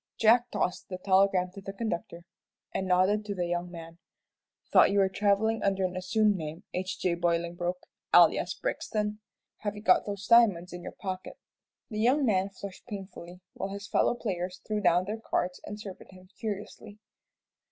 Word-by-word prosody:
Jack 235 +2 +5
tossed 180 - -2
the 185 - -4
telegram 190 -1 +3
to 195 - -10
the 195 0 -7
conductor, 175 -5 -4 0.5
and 190 - -2
nodded 185 +4 +3
to 205 -1 -4
the 180 -2 -1
young 175 +1 -2
man. 165 -1 -10 0.7
"Thought - - +7
you 200 - +1
were 195 -1 +4
travelling 205 +3 +1
under 195 -1 +1
an 180 0 -3
assumed 210 +3 +2
name. 160 0 -6
H. 185 +1 -3
J. 180 - +1
Bolingbroke 175 +1 -1 0.3
alias - - +5
Blixton. 210 - -2 0.4
Have 210 0 -4
you 210 - -9
got 185 -1 +4
those 200 -1 -4
diamonds 205 -7 +4
in 175 - -7
your - - -7
pocket?" 185 -2 -6 0.5
The 215 - -3
young 260 +6 +3
man 195 -4 +2
flushed 195 +1 -10
painfully, 190 -4 -8
while 195 - -4
his 200 +1 -7
fellow - - +2
players 185 -5 -4
threw 215 -1 -1
down 175 -1 +3
their 215 +3 -4
cards 180 -4 -2
and 210 0 -7
surveyed 195 -3 -9
him 185 -1 -16
curiously. 210 -1 -6
195 Hz, 175 wpm, -29 LUFS, 180-210 Hz, 0.7 s, Thought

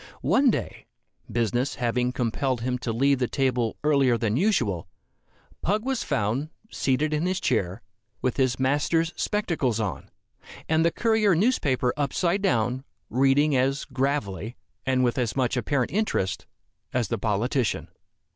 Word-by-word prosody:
One 275 -1 +4
day, - - -3 0.4
business 120 +3 0
having 125 +1 0
compelled 125 +1 -1
him 125 +1 -1
to 120 - -3
leave 135 +4 +2
the 125 - +1
table 125 -4 0
earlier 140 -5 +3
than 110 -2 0
usual, 125 - +1 0.7
Pug 210 +5 0
was 265 -2 -1
found, 115 +9 -1 0.2
seated 140 +3 0
in 155 +4 0
his 185 0 0
chair, 95 -7 -1 0.4
with 130 - -1
his 130 -2 +1
master's 150 +5 +1
spectacles 165 - 0
on, 105 -5 -3 0.6
and 160 0 +3
the 170 - +4
Courier 220 -1 +2
newspaper 145 - +1
upside 170 +7 0
down, 125 - +1 0.3
reading 135 +4 +3
as 135 +3 +1
gravely, 130 -5 -2 0.3
and 130 -1 +2
with 120 +1 +1
as 120 -4 -1
much 130 -1 +1
apparent 130 0 0
interest, 195 - -1 0.4
as 120 -5 -1
the - - -1
politician. 115 +3 0
130 Hz, 140 wpm, -26 LUFS, 120-155 Hz, 0.7 s, One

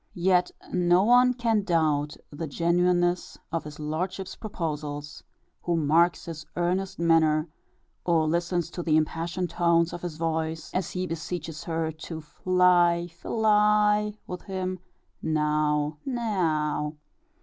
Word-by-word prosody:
Yet 180 0 +3 0.2
no 180 +1 +4
one 245 +2 +5
can 230 -3 +1
doubt 155 -6 +1
the 155 +2 -5
genuineness 175 +3 +1
of 165 -2 -2
his 150 0 -9
lordship's 180 +5 -3
proposals, 150 -7 -5 0.4
who 175 - 0
marks 165 +3 +3
his 160 -2 -7
earnest 180 +2 -1
manner, 160 -2 +3 0.6
or 165 -3 +2
listens 170 +1 0
to 175 - -5
the 155 -2 +3
impassioned 170 +3 -1
tones 170 -1 +2
of 175 - -6
his 175 -3 -5
voice 160 0 -2
as 185 -2 -1
he 185 0 -3
beseeches 165 -2 -5
her 160 -1 -1
to 160 +1 -7
Fly, 175 +2 +2
fil 175 +6 -5
ly 210 0 +4
with 180 - -6
him 185 -1 -4 0.4
now, 150 -1 0
ne 255 -3 -3
ow 165 -9 0
w. 150 +1 -5
170 Hz, 135 wpm, -27 LUFS, 155-185 Hz, 0.6 s, one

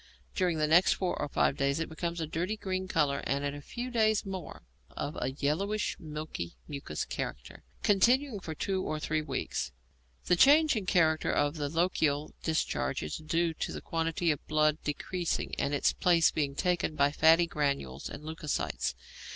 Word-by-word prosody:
During 180 -3 +1
the 155 - +2
next 165 +4 +5
four 185 -2 -1
or - - -1
five 135 - +1
days 140 +2 +1
it 165 - -1
becomes 170 +2 -4
of 160 - -2
a - - -18
dirty 180 +7 -1
green 190 -2 -3
colour, 150 -6 +1
and 140 +1 0
in 140 - -1
a 145 - -7
few 245 - -6
days 220 -3 +2
more 190 - -7 0.3
of 145 +2 -5
a 130 +1 -1
yellowish, 190 +10 -1
milky, 150 - -6
mucous 140 - -4
character, 65 - -6 0.2
continuing 240 +4 +3
for 160 -3 -6
two 190 +3 -1
to 155 0 -2
three 155 0 -1
weeks. 155 - -3 0.5
The 180 - +4
change 295 - +6
in 205 -4 -3
character 160 -4 +3
of 145 +2 +1
the 145 -1 -2
lochial 155 -3 +1
discharge 155 - -1
is 75 - -4
due 165 +2 0
to - - -4
the - - -5
quantity 165 0 0
of 145 - -4
blood 155 0 +2
decreasing 170 +4 -2
and 140 - 0
its 145 - +2
place 170 -2 +4
being 140 -2 -1
taken 175 -2 0
by 140 -1 +3
fatty 160 +3 +5
granules 140 - -2
and 145 - -8
leucocytes. 155 - -2
160 Hz, 180 wpm, -30 LUFS, 145-180 Hz, 0.5 s, change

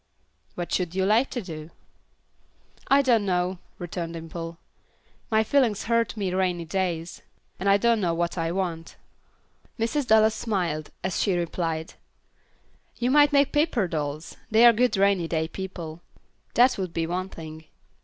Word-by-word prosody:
"What 175 -1 -5
should 180 -1 -1
you 190 0 +1
like 225 +6 +3
to 245 - -4
do?" 155 -3 -8 1.2
"I 280 +1 +5
don't 235 -5 +3
know," 180 -1 0 0.2
returned 170 -1 -5
Dimple. 165 0 -7 0.7
"My 220 -1 +3
feelings 230 -4 +2
hurt 230 -1 0
me 190 -3 -1
rainy 180 -2 0
days, 170 -1 -3 0.4
and 195 +2 +1
I 200 - +6
don't 230 +1 +2
know 170 -3 +1
what 170 0 -1
I 165 -1 -1
want." 170 -3 -3 0.8
Mrs. 245 +4 -1
Dallas 220 -1 +5
smiled, 180 -9 -2
as 185 -1 -1
she 190 -3 +1
replied, 165 -1 -3 1.0
"You 245 +1 0
might 290 +1 +6
make 280 -1 +3
paper 295 - +1
dolls, 155 -1 -4
they 225 +1 +6
are 235 - +9
good 240 -1 +2
rainy 195 -3 +3
day 160 -1 -1
people; 170 -3 -7 0.5
that 245 -2 +5
would 185 -3 -3
be 165 - -1
one 180 +3 -3
thing. 160 -2 -10
185 Hz, 155 wpm, -25 LUFS, 165-220 Hz, 1.2 s, are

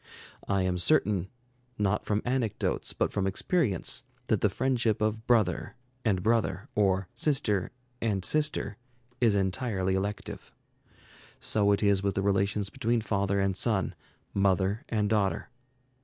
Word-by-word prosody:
I 100 -1 +1
am 90 -1 0
certain, 95 - +2 0.5
not 105 0 0
from 105 0 0
anecdotes 120 -4 -1
but - - -1
from 95 -1 0
experience, 105 - 0 0.3
that - - +2
the - - +4
friendship 120 -5 +1
of 110 +1 -1
brother 115 -4 +2 0.3
and 95 -5 +1
brother, 110 -1 0
or 95 -2 +2
sister 120 - 0 0.3
and 100 -5 0
sister, 150 -7 +1 0.4
is 115 -4 +3
entirely 95 -1 0
elective. 100 +2 -4 0.9
So 100 -1 +3
it 100 - +1
is 100 -2 +3
with 100 -1 -1
the 95 - 0
relations 100 0 +1
between 115 +1 0
father 100 -2 0
and 95 -1 +1
son, 105 -1 +1 0.4
mother 100 +1 +1
and 105 -2 +1
daughter. 100 -2 0
100 Hz, 135 wpm, -29 LUFS, 95-110 Hz, 0.9 s, the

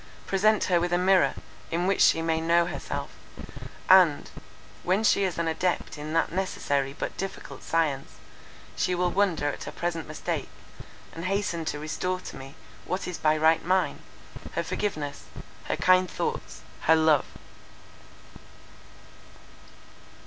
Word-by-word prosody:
Present 210 +2 +2
her 175 -2 +2
with 175 +1 -1
a - - +4
mirror, 185 +1 +3 0.3
in 170 +2 -1
which 195 +1 +1
she 165 - +5
may 160 0 0
know 170 +1 +3
herself; - - -5 0.8
and, 180 -6 +5 0.5
when 190 +4 +1
she 200 -2 +4
is 185 - -3
an 170 -1 -1
adept 175 +2 -1
in 150 0 -6
that 165 - +1
necessary 145 -7 -1
but - - -4
difficult 195 0 -6
science, 150 -5 -1 0.6
she 180 - 0
will 180 0 +1
wonder 185 -7 +1
at 145 - -6
her - - -6
present 170 -2 -3
mistake, 155 - -4 0.6
and 165 +2 -6
hasten 185 -4 -1
to 150 - -2
restore 180 +5 -3
to - - -9
me, 135 +1 -10 0.3
what 185 - -3
is 180 - -5
by 155 0 +3
right 160 +1 +3
mine, 185 +2 +1 0.5
her - - -1
forgiveness, 150 -9 -3 0.4
her - - -1
kind 185 0 +4
thoughts, - - -4 0.2
her 160 - +6
love." 155 -3 +4
170 Hz, 140 wpm, -27 LUFS, 160-185 Hz, 0.8 s, her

